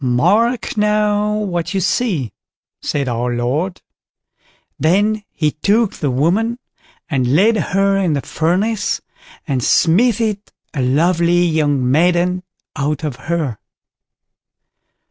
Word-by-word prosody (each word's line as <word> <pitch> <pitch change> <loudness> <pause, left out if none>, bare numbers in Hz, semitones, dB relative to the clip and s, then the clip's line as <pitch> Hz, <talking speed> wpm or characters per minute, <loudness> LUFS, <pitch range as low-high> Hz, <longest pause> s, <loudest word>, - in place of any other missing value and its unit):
"Mark 205 - +1
now, 210 0 +1
what 180 -4 -2
you - - +2
see", 175 - -1 0.5
said 140 -2 -2
our 120 0 -1
Lord. 145 +10 -2 1.0
Then 205 +7 +2
he 155 -2 0
took 205 +8 +1
the 145 - -2
woman 185 - +1 0.5
and 130 -3 0
laid 215 +7 +4
her 195 -1 +1
in 185 -5 +1
the 140 - -1
furnace, 195 +6 -1 0.5
and 135 -4 -1
smithied 215 - +2 0.3
a 140 - -2
lovely 170 +6 +2
young 145 -6 +1
maiden 175 +4 +2 0.3
out 145 +1 -2
of 150 -5 -3
her. 150 -10 -1
175 Hz, 110 wpm, -18 LUFS, 145-205 Hz, 1.0 s, laid